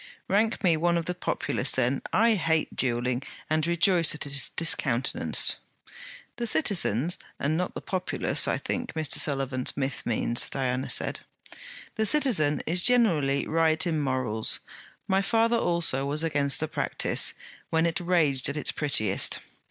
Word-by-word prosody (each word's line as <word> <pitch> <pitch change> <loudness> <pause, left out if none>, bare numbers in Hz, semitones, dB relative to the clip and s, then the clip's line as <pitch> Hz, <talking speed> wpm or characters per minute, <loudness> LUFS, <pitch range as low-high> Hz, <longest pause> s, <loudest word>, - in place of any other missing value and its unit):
'Rank 220 +3 0
me 175 -3 +4
one 170 +2 +1
of 170 - -3
the 180 - -2
populace 140 -6 -2
then! 130 +1 0
I 230 +3 +3
hate 160 -5 -1
duelling 125 0 0 0.3
and 155 +1 +1
rejoice 170 -1 +3
that 150 - -4
it 140 - -4
is 135 -1 +2
discountenanced.' 135 -6 +1 0.8
'The 240 -1 -2
citizens, 175 - +1 0.2
and 150 +3 0
not 180 +2 -3
the - - -5
populace, 185 -1 -1
I - - 0
think 245 -1 -4
Mr. 155 -3 +1
Sullivan 135 -3 0
Smith 135 -1 -2
means,' 120 +1 0
Diana 130 -1 -2
said. - - -2 0.8
'The 220 - +1
citizen 205 - +2
is 175 +2 0
generally 170 - +2
right 160 0 +1
in 160 -3 -1
morals. 130 -5 -1 0.5
My 195 -1 +2
father 230 +3 +1
also 170 -9 0
was 150 +3 0
against 145 -3 0
the 160 - -1
practice, - - 0 0.3
when 160 0 +1
it 170 +3 0
raged 160 -7 +1
at 140 - -4
its 150 - 0
"prettiest." 110 -10 +1
155 Hz, 150 wpm, -26 LUFS, 135-180 Hz, 0.8 s, me